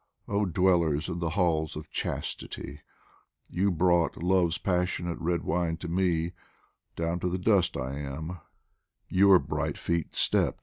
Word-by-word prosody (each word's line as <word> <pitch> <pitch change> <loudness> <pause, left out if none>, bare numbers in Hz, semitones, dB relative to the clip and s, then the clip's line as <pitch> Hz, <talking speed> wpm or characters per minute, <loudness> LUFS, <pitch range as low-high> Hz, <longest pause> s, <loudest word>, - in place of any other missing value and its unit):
Oh 100 0 +1
dwellers 85 -4 +2
in 85 - -3
the 85 -1 -1
halls 80 -3 0
of 75 0 -8
Chastity! 70 +1 -5 0.7
You 95 +3 +1
brought 85 -1 +2
Love's 90 -1 +2
passionate 90 -2 -1
red 85 +1 -1
wine 80 0 0
to 90 - -6
me, 85 -1 +1 0.6
Down 85 +1 -1
to 90 - -1
the 90 - -1
dust 95 -1 +2
I 65 +3 -4
am, 80 +5 -5 0.7
your 95 0 +6
bright - - -2
feet 85 -3 -2
stept. - - +2
85 Hz, 140 wpm, -28 LUFS, 80-90 Hz, 0.7 s, your